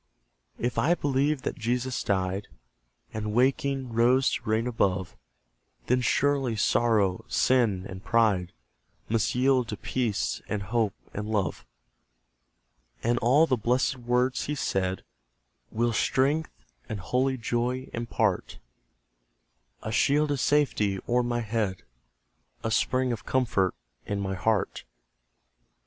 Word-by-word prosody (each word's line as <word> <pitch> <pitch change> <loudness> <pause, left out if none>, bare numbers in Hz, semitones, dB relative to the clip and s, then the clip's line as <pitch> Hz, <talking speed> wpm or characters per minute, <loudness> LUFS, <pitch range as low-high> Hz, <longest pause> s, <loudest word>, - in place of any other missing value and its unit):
If 120 0 -1
I 170 +4 +3
believe 140 -2 0
that - - -4
Jesus 125 +2 -1
died, 95 0 -1 0.7
And 105 -1 -3
waking, 135 0 +1
rose 125 +3 +4
to - - -4
reign 110 +2 +1
above; 100 -6 0 0.7
Then 125 +1 +2
surely 135 -1 +1
Sorrow, 105 -3 +2
Sin, 110 -8 +2
and 95 0 -9
Pride, 105 -7 +2 0.6
Must 115 +1 +1
yield 130 -1 +3
to 105 - -5
Peace, 105 - -1
and 105 -2 -2
Hope, 110 0 0 0.2
and 105 +1 -4
Love. 105 -4 -2 1.4
And 120 +1 +2
all 135 +8 +5
the 135 - +1
blessed 125 +4 +1
words 125 +1 0
He 150 - -2
said 95 -8 -1 0.7
Will 120 +1 0
strength 135 - 0 0.2
and 105 - -4
holy 130 +7 0
joy 120 +3 -1
impart: 115 -4 -1 1.3
A 110 - -4
shield 145 +5 +2
of 140 - -1
safety 125 -9 +2
o'er 125 +1 +3
my 120 0 -1
head, 105 -4 -2 0.8
A 110 - -1
spring 130 +3 +1
of 115 - -4
comfort 110 -8 +1 0.3
in 100 -1 -2
my 95 -1 -2
heart. 105 +2 0
120 Hz, 125 wpm, -27 LUFS, 105-130 Hz, 1.4 s, all